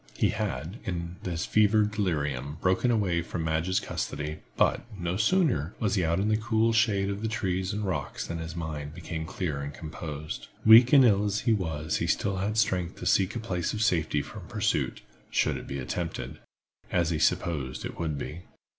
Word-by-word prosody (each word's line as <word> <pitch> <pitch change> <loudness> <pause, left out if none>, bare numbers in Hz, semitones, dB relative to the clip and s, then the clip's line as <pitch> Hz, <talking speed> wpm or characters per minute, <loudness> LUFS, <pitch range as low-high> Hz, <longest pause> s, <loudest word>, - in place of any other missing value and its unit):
He - - +3
had, 80 - -3
in 85 -1 -4
his 85 -3 -2
fever 110 0 +4
delirium, 75 - -1
broken 95 +8 +2
away 100 -7 +2
from 85 0 -4
Madge's 80 +4 +1
custody, 75 +1 -4 0.2
but, - - +3 0.2
no 85 -1 -2
sooner 110 - +2
was 105 -4 0
he 95 -3 +2
out 85 +2 +1
in 100 - +1
the 110 0 +3
cool 110 0 +2
shade 105 -3 +3
of 100 +1 -4
the 110 - -1
trees 95 -4 -1
and 105 0 -2
rocks 75 -9 -3
than 85 0 -4
his 80 0 -6
mind 75 -3 -5
became 80 -2 -5
clear 75 -6 -3
and 70 0 -4
composed. 75 0 -6 0.2
Weak 115 +3 +9
and 135 -3 +8
ill 105 -3 +4
as 105 +1 0
he 115 -2 +3
was 80 -6 -1
he - - -1
still 100 -1 0
had 105 +3 -1
strength 90 -5 +1
to - - -8
seek 95 +2 +3
a - - -1
place 90 -7 -2
of 110 0 0
safety 80 -7 +1
from - - -10
pursuit, - - -1 0.3
should - - +1
it - - -7
be 70 - -4
attempted, 65 -2 -4 0.5
as 85 -2 +1
he 80 - 0
supposed 70 -4 0
it - - -7
would 80 -3 -1
be. 80 +5 -6
90 Hz, 195 wpm, -28 LUFS, 80-105 Hz, 0.5 s, Weak